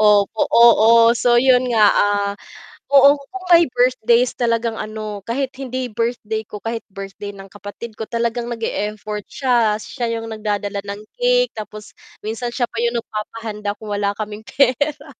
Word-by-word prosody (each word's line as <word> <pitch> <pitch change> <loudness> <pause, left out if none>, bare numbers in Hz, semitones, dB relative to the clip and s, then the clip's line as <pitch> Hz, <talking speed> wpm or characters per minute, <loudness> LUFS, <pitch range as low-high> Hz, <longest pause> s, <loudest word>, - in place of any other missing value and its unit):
opo, 210 0 +3
oo. 230 0 +6
So, 240 +1 +2
'yon 255 0 +4
nga, 220 -2 +4
ah, 205 0 +1 0.6
oo 280 0 +7
kung 370 +7 -10
may 340 0 +7
birthdays 245 -1 +2
talagang 230 -1 0
ano, 215 -1 -6
kahit 265 +3 -2
hindi 255 -1 -4
birthday 220 -1 -2
ko- 210 - -7
kahit 230 0 -3
birthday 195 +1 -7
ng 195 -1 -11
kapatid 205 +2 -9
ko- 220 - -5
talagang 235 0 -2
nag-e-effort 210 -2 -4
siya. 240 -5 +1
Siya 240 0 -4
yung 225 - -7
nagdadala 205 -2 -3
ng 200 +1 -6 0.2
cake, - - +2
tapos 215 -1 -9 0.3
minsan 230 +3 -3
siya 245 -2 0
pa 230 - -4
yung 235 0 0
nagpapahanda 210 -2 -5
kung 215 -2 -7
wala 200 0 0
kaming 210 0 -6
pera 280 +3 +1
230 Hz, 155 wpm, -19 LUFS, 210-245 Hz, 0.6 s, oo